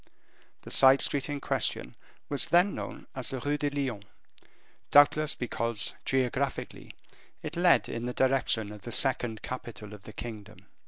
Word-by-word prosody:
The - - -10
side 135 +1 +6
street 140 0 +1
in 145 -1 -3
question - - -2 0.3
was 145 -2 -1
then 180 +4 +4
known - - -7
as 130 -3 -3
the 135 - -4
Rue 145 +4 -1
de 145 - 0
Lyon, 135 -8 -3 0.9
doubtless 150 +1 +5
because, 115 -2 -2
geographically, 130 -2 -2 0.5
it 155 +2 -5
led 175 +1 +4
in 115 +1 -4
the - - -2
direction 130 -6 +1
of 105 -1 -10
the 120 - -7
second 120 -3 +2
capital 115 -4 -7
of 105 - -11
the 110 - -10
kingdom. 105 -3 -9
130 Hz, 155 wpm, -29 LUFS, 115-145 Hz, 0.9 s, side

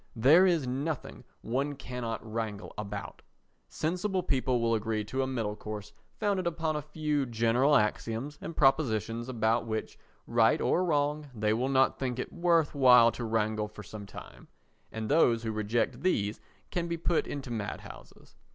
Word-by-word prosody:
There 150 +11 +6
is 170 -6 +2
nothing 140 +4 -4 0.2
one 140 +5 -1
cannot 125 -4 -5
wrangle 110 -4 -4
about. 105 -1 -6 0.5
Sensible 185 +4 -1
people 130 -5 +1
will 115 0 +1
agree 110 -1 -1
to 130 +6 -2
a 130 - 0
middle 115 -5 -2
course 105 -1 -7 0.3
founded 195 -4 0
upon 160 -2 -1
a 150 - -1
few 150 -1 -1
general 120 +5 +3
axioms 115 +5 -1
and 165 - -7
propositions 120 -5 +2
about 115 -1 +1
which, 110 -1 -4 0.3
right 115 +5 +3
or 180 - +2
wrong, 150 -2 0
they 105 0 +1
will 125 +4 0
not 130 -1 +3
think 125 -2 -2
it 125 - -5
worth 170 -3 +2
while 125 -4 +7
to 120 - -6
wrangle 110 -1 0
for 105 0 -11
some 105 -1 -9
time, - - -12 0.4
and 110 -1 -4
those 120 -6 +3
who 110 - -2
reject 110 +2 -1
these 105 - 0 0.3
can 175 -1 -1
be 170 0 -2
put 165 0 0
into 135 -3 -5
mad 110 -3 -4
houses. - - -14
125 Hz, 165 wpm, -30 LUFS, 110-150 Hz, 0.5 s, while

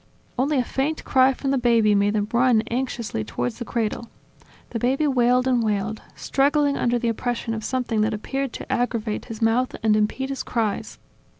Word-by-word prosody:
Only 275 +4 +1
a 255 - +3
faint 280 +6 -2
cry 260 0 +4
from 270 +1 -3
the 275 - +2
baby 230 -3 +4
made 205 0 +2
them 205 -1 0
run 240 -2 +4
anxiously 235 - -2
towards 120 +3 -4
the 240 - -4
cradle. 230 0 -2 0.6
The 230 - -2
baby 265 +6 +1
wailed 250 -2 +3
and 250 -2 +2
wailed, 215 0 -1
struggling 285 +1 +1
under 240 0 +1
the 235 - -2
oppression 235 0 -2
of 220 -1 -4
something 245 -4 -1
that 215 +1 +1
appeared 270 +5 -3
to - - -7
aggravate 235 -4 -1
his 225 -1 -5
mouth 240 +3 +2
and 215 -1 +4
impede 215 +5 0
his 275 - -3
cries 220 -4 -2
240 Hz, 185 wpm, -23 LUFS, 220-260 Hz, 0.6 s, cry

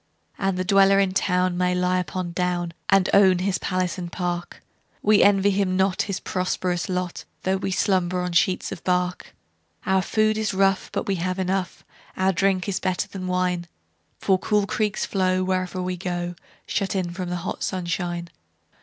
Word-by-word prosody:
The 195 -2 0
dweller 195 +1 +5
in 195 -1 +2
town 180 -2 +1
may 180 0 +2
lie 180 0 +1
upon 180 -1 -3
down, 175 -1 -1 0.2
And 195 -2 +4
own 190 -2 +6
his 185 +1 0
palace 185 0 -1
and 175 -1 -5
park:We 180 +4 -1
envy 200 0 +5
him 190 -1 +1
not 190 0 +2
his 195 -1 -3
prosperous 180 -2 -2
lot, 180 -1 -3 0.2
Though 190 +1 +1
we 190 - -3
slumber 185 -1 +1
on 180 0 -2
sheets 180 +2 +1
of - - -7
bark. 180 0 -1 0.5
Our 190 0 +3
food 215 +2 +1
is 215 -3 -1
rough, 195 0 +2
but - - -2
we 195 -2 0
have 185 +2 -2
enough; 190 0 -2 0.3
Our 190 +1 +2
drink 185 0 +1
is 190 -2 -1
better 185 -2 -1
than 185 -2 -6
wine:For 175 - -2
cool 210 0 +1
creeks 210 0 -1
flow 185 -1 +1
wherever 185 0 -1
we 180 0 -2
go, 175 -1 -3 0.3
Shut 195 -1 -1
in 180 -2 -1
from 180 0 -5
the 180 - -2
hot - - -4
sunshine. 175 -1 -2
185 Hz, 170 wpm, -24 LUFS, 180-195 Hz, 0.5 s, own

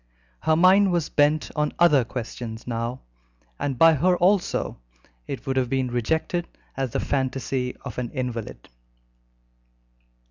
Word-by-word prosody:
Her 155 - +2
mind 185 +3 +5
was 170 -3 0
bent 150 +1 +2
on 150 -1 0
other 150 -7 +5
questions 115 -1 -6
now, 120 +1 -3 0.6
and 135 -3 -2
by 165 +4 +7
her 180 +5 +2
also 185 - +1 0.5
it - - -6
would 135 0 -1
have 125 -2 +1
been 130 -1 -1
rejected 160 +8 -1 0.3
as 135 -1 -2
the - - -2
fantasy 130 -1 -2
of 125 -2 -5
an 120 -2 -3
invalid. 120 - -5
135 Hz, 135 wpm, -24 LUFS, 125-160 Hz, 0.6 s, by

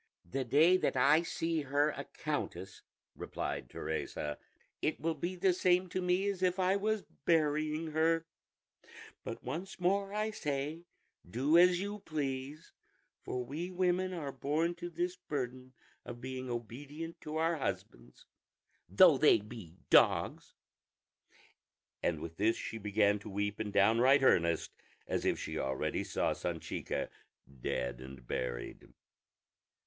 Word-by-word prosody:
"The 135 +10 -2
day 155 +9 +5
that 150 - 0
I 145 +5 +5
see 165 -1 -1
her 145 +2 +2
a - - -6
countess," - - -4 0.3
replied - - -4
Teresa, 75 -1 -4 0.4
"it 155 - 0
will 165 0 0
be 175 +4 -3
the 185 +1 +3
same 180 0 +2
to 185 - -2
me 180 +2 +1
as 195 -2 -2
if 180 0 +2
I 185 +1 +3
was 215 +1 0 0.2
burying 155 0 +1
her; 165 +1 +2 1.0
but - - -6
once 190 +4 -5
more 195 +2 +1
I 215 +1 -1
say 150 -2 -3 0.4
do 135 - +2
as 175 +1 +6
you 205 +2 -4
please, 145 -2 -4 0.5
for 125 -1 -4
we 160 +8 -4
women 185 0 +1
are 155 -6 -4
born 150 +6 0
to 175 +1 -5
this 175 +2 -2
burden 130 -6 -5 0.3
of 120 0 -8
being 130 0 -5
obedient 140 +8 -6
to 155 0 -6
our 165 +1 +1
husbands, - - -5 0.6
though - - +7
they - - +7
be 105 -5 -10 0.2
dogs;" - - +4 1.5
and 80 -3 0
with 80 0 -7
this 110 +3 +3
she 115 - -5
began 105 0 +2
to 105 - -9
weep 105 +1 -2
in 105 - -2
downright 115 +8 +5
earnest, 85 -9 +3 0.4
as - - -1
if - - +2
she - - -4
already 65 0 -1
saw - - 0
Sanchica - - -3 0.5
dead 60 0 -2
and 65 -1 -10
buried. - - -4
150 Hz, 140 wpm, -33 LUFS, 120-175 Hz, 1.5 s, though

